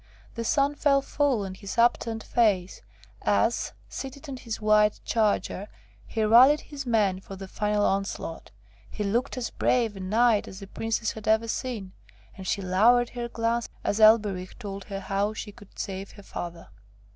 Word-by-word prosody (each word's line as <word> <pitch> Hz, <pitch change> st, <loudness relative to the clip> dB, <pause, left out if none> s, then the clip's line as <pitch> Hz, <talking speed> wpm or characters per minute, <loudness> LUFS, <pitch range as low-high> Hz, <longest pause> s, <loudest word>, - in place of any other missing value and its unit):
The 230 Hz, -, -4 dB
sun 280 Hz, +4 st, +2 dB
fell 280 Hz, -2 st, +2 dB
full 275 Hz, -8 st, 0 dB
on 190 Hz, -, -6 dB
his 195 Hz, +1 st, -8 dB
upturned 230 Hz, -1 st, +2 dB
face, 200 Hz, -6 st, +1 dB, 0.4 s
as, 105 Hz, -, +1 dB
seated 275 Hz, +3 st, -7 dB
on 270 Hz, -2 st, -6 dB
his 230 Hz, -3 st, -5 dB
white 215 Hz, -1 st, +3 dB
charger, 210 Hz, -3 st, 0 dB, 0.4 s
he 220 Hz, -, -1 dB
rallied 255 Hz, +7 st, +7 dB
his 280 Hz, -3 st, -8 dB
men 205 Hz, -5 st, +2 dB
for 195 Hz, 0 st, -10 dB
the 195 Hz, 0 st, -8 dB
final 210 Hz, +1 st, 0 dB
onslaught; 195 Hz, +1 st, -2 dB, 0.4 s
he 210 Hz, -, -4 dB
looked 230 Hz, +6 st, -1 dB
as 245 Hz, -, -3 dB
brave 230 Hz, -4 st, +1 dB
a -, -, -8 dB
knight 215 Hz, +3 st, +2 dB
as 190 Hz, -, -9 dB
the 200 Hz, -, -8 dB
Princess 225 Hz, +2 st, -2 dB
had 220 Hz, -, -9 dB
ever 220 Hz, +1 st, +3 dB
seen, 225 Hz, -5 st, -4 dB, 0.4 s
and 190 Hz, -1 st, -8 dB
she 200 Hz, -, -1 dB
lowered 230 Hz, +7 st, +4 dB
her 240 Hz, -1 st, -5 dB
glance 230 Hz, 0 st, -1 dB
as 205 Hz, -, 0 dB
Elberich 210 Hz, -4 st, +4 dB
told 200 Hz, -4 st, -7 dB
her 195 Hz, -1 st, -5 dB
how 200 Hz, +2 st, -1 dB
she 215 Hz, -, -6 dB
could 205 Hz, -1 st, -17 dB
save 195 Hz, 0 st, -5 dB
her 205 Hz, -, -13 dB
father. 170 Hz, -3 st, -7 dB
215 Hz, 170 wpm, -27 LUFS, 195-235 Hz, 0.4 s, rallied